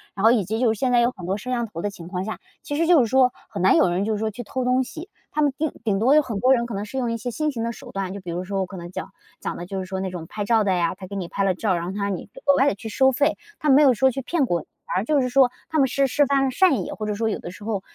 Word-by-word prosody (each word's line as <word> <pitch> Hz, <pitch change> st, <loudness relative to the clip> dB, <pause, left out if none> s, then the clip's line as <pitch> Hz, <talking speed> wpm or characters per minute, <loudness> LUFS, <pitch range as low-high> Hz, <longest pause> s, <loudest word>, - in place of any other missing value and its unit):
然 195 Hz, -, -4 dB
后 225 Hz, -, +7 dB
以 225 Hz, -6 st, +2 dB
及， 220 Hz, +5 st, -2 dB
就 240 Hz, -2 st, +3 dB
是 215 Hz, -, -9 dB
现 260 Hz, -2 st, +1 dB
在 245 Hz, -, +5 dB
有 240 Hz, +1 st, +3 dB
很 185 Hz, -7 st, -10 dB
多 190 Hz, +3 st, -1 dB
摄 215 Hz, +5 st, -8 dB
像 240 Hz, -2 st, 0 dB
头 175 Hz, -7 st, -7 dB
的 205 Hz, -, -1 dB
情 175 Hz, -4 st, -10 dB
况 180 Hz, 0 st, -3 dB
下， 220 Hz, +2 st, -5 dB, 0.2 s
其 290 Hz, -, -4 dB
实 330 Hz, -, +2 dB
就 340 Hz, -5 st, +6 dB
是 235 Hz, -, +1 dB
说 255 Hz, +1 st, +4 dB, 0.2 s
很 200 Hz, -4 st, -4 dB
难 190 Hz, -, +6 dB
有 185 Hz, -, +4 dB
人， 180 Hz, +3 st, 0 dB
就 220 Hz, -, 0 dB
是 210 Hz, -, -2 dB
说 220 Hz, 0 st, 0 dB
去 245 Hz, +4 st, -7 dB
偷 255 Hz, +4 st, -3 dB
东 255 Hz, +1 st, +2 dB
西。 320 Hz, +8 st, -9 dB, 0.3 s
他 305 Hz, -, +2 dB
们 290 Hz, -1 st, +3 dB
顶 310 Hz, -1 st, -1 dB
顶 210 Hz, -4 st, +1 dB
多 240 Hz, +7 st, +4 dB
有 305 Hz, -, +7 dB
很 235 Hz, -8 st, -4 dB
多 255 Hz, +5 st, +5 dB
人 235 Hz, -2 st, +1 dB
可 235 Hz, -, -5 dB
能 200 Hz, +1 st, -3 dB
是 215 Hz, -, -10 dB
用 240 Hz, -2 st, -1 dB
一 230 Hz, -, -1 dB
些 245 Hz, +2 st, -4 dB
新 305 Hz, +5 st, -1 dB
型 230 Hz, -4 st, -4 dB
的 230 Hz, -, -1 dB
手 -, -, -11 dB
段， 195 Hz, -1 st, -3 dB
就 200 Hz, -, -6 dB
比 180 Hz, -, -8 dB
如 175 Hz, +2 st, -3 dB
说 195 Hz, +1 st, -3 dB
我 190 Hz, -, -1 dB
可 190 Hz, -, -9 dB
能 175 Hz, 0 st, -8 dB
讲 -, -, -6 dB, 0.3 s
讲 -, -, -4 dB
的， 175 Hz, -, -6 dB
就 190 Hz, +1 st, -4 dB
是 190 Hz, -, -4 dB
说 190 Hz, 0 st, -4 dB
那 190 Hz, -1 st, -3 dB
种 170 Hz, -3 st, -7 dB
拍 205 Hz, +3 st, -4 dB
照 225 Hz, 0 st, +3 dB
的 200 Hz, -, +1 dB
呀， 170 Hz, -2 st, +1 dB
他 185 Hz, -, -10 dB
给 200 Hz, -, -7 dB
你 185 Hz, -3 st, -3 dB
拍 195 Hz, -, -2 dB
了 190 Hz, -2 st, +2 dB
照， 200 Hz, 0 st, 0 dB
然 170 Hz, -1 st, -1 dB
后 180 Hz, -, -4 dB
他 200 Hz, +1 st, -3 dB
让 200 Hz, -1 st, 0 dB
你 -, -, -9 dB, 0.2 s
额 280 Hz, -, +5 dB
外 275 Hz, +1 st, +4 dB
地 -, -, -2 dB
去 215 Hz, -, -8 dB
收 265 Hz, +5 st, +3 dB
费。 290 Hz, +4 st, +2 dB, 0.2 s
他 300 Hz, -, -3 dB
没 280 Hz, +1 st, +6 dB
有 270 Hz, -4 st, +6 dB
说 265 Hz, +4 st, +3 dB
去 270 Hz, +2 st, -4 dB
骗 300 Hz, +2 st, 0 dB
过 175 Hz, -8 st, 0 dB
你， -, -, -17 dB, 0.2 s
反 -, -, -4 dB
而 185 Hz, -, +1 dB
就 290 Hz, +5 st, +2 dB
是 250 Hz, -, 0 dB
说 255 Hz, -1 st, +4 dB, 0.2 s
他 315 Hz, -1 st, 0 dB
们 270 Hz, -, +4 dB
是 275 Hz, +2 st, +1 dB
释 280 Hz, +2 st, +2 dB
放 275 Hz, 0 st, +2 dB
了 265 Hz, -, 0 dB
善 275 Hz, -, +3 dB
意， -, -, -6 dB
或 215 Hz, -, -5 dB
者 210 Hz, -, -1 dB
说 225 Hz, +1 st, 0 dB
有 -, -, -2 dB
的 -, -, -7 dB
时 185 Hz, +4 st, -11 dB
候 210 Hz, -2 st, -2 dB
225 Hz, 395 characters per minute, -23 LUFS, 195-260 Hz, 0.3 s, 后